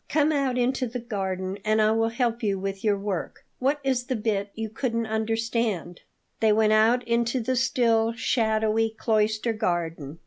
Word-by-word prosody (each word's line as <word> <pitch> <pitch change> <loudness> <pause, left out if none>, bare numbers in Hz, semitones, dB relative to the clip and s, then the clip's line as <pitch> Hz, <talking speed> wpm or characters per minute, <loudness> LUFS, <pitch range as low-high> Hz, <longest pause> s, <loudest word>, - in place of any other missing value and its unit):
Come 300 +1 +2
out 275 -4 0
into 255 +1 +1
the 240 +2 -5
garden, 195 -4 -4
and 215 +1 +2
I 215 0 +4
will 225 0 +2
help 235 0 -1
you 200 -3 0
with 195 0 -4
your 210 -2 +2
work. 195 -3 -4
What 275 +3 +1
is 260 -2 0
the 255 - -2
bit 210 -2 -1
you 225 0 -3
couldn't 230 +1 -2
understand?" 220 -4 -2 0.4
They 220 -1 +4
went 215 0 +3
out 230 +3 +3
into 235 +2 +1
the 250 +2 -1
still, 230 -3 +2
shadowy 220 -1 +1
cloister 220 0 0
garden. 165 - -2
225 Hz, 170 wpm, -25 LUFS, 210-240 Hz, 0.4 s, I